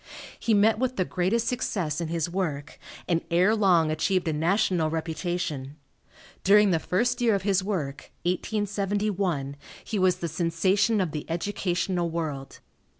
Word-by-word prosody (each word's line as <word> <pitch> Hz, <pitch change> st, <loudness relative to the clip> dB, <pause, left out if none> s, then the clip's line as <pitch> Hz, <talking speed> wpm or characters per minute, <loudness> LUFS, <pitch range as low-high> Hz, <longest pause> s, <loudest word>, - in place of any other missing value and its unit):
He 225 Hz, -, +2 dB
met 215 Hz, +2 st, +4 dB
with 255 Hz, 0 st, 0 dB
the 185 Hz, -, 0 dB
greatest 195 Hz, +8 st, 0 dB
success 175 Hz, -, -1 dB
in 165 Hz, -, -2 dB
his 165 Hz, 0 st, -1 dB
work, 160 Hz, -5 st, -3 dB, 0.3 s
and 170 Hz, -1 st, +1 dB
ere 180 Hz, +6 st, +3 dB
long 175 Hz, -7 st, +3 dB
achieved 180 Hz, +3 st, 0 dB
a 160 Hz, -, +1 dB
national 170 Hz, 0 st, +1 dB
reputation. 160 Hz, -3 st, -3 dB, 0.7 s
During 205 Hz, +1 st, +6 dB
the 165 Hz, -, +2 dB
first 245 Hz, +9 st, 0 dB
year 230 Hz, -3 st, +4 dB
of 195 Hz, -, -2 dB
his 195 Hz, -1 st, +2 dB
work, 150 Hz, -9 st, -4 dB
1871, 195 Hz, -5 st, -1 dB, 0.3 s
he 210 Hz, -, -3 dB
was 185 Hz, -1 st, +4 dB
the 175 Hz, -1 st, -4 dB
sensation 185 Hz, +6 st, +1 dB
of 180 Hz, -4 st, -1 dB
the 150 Hz, +1 st, -6 dB
educational 175 Hz, 0 st, -1 dB
world. 155 Hz, -5 st, -5 dB
180 Hz, 150 wpm, -26 LUFS, 160-205 Hz, 0.7 s, During